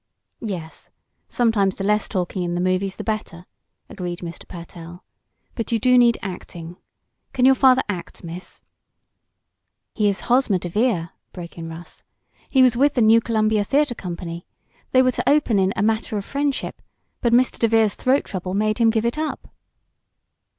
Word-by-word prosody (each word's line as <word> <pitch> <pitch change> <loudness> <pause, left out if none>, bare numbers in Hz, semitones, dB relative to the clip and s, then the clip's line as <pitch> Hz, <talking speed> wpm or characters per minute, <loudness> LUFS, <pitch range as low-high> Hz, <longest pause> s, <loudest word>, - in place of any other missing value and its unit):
"Yes, 175 -7 -6 0.4
sometimes 215 -5 +1
the 195 - -5
less 210 +1 +1
talking 185 -1 -2
in 175 0 -2
the - - -1
movies 185 +1 0
the - - -6
better," 210 -5 -4 0.4
agreed 175 -2 -6
Mr. 170 -1 -8
Pertell. 170 0 -10 0.5
"But 230 0 -4
you 230 - +3
do 250 +3 +3
need 240 -2 +5
acting. 175 -3 -7 0.6
Can 250 - +2
your 265 - +7
father 260 -1 +4
act, 180 -3 -6
Miss?" 170 +2 -8 1.3
"He 210 -2 +2
is 200 - -3
Hosmer 245 -5 +2
DeVere," 180 0 0 0.2
broke 175 -2 -9
in 165 -1 -7
Russ. 165 +2 -10 0.5
"He 265 -2 +5
was 250 -2 +4
with 280 +4 +3
the 245 - +3
New 225 +1 +6
Columbia 215 -2 +1
Theatre 280 +4 +1
Company. 170 -4 -7 0.4
They 255 0 +4
were 255 - +3
to - - -1
open 280 -8 +3
in 190 0 +2
'A - - 0
Matter 220 0 0
of 200 - -4
Friendship,' 280 -1 -2 0.4
but 235 - +1
Mr. 245 +2 +3
DeVere's 225 -3 +3
throat 265 +2 +1
trouble 185 -1 -5
made 215 +2 0
him 230 -1 +5
give 225 0 0
it 240 +6 -1
up." 310 -1 -4
210 Hz, 165 wpm, -22 LUFS, 180-240 Hz, 1.3 s, your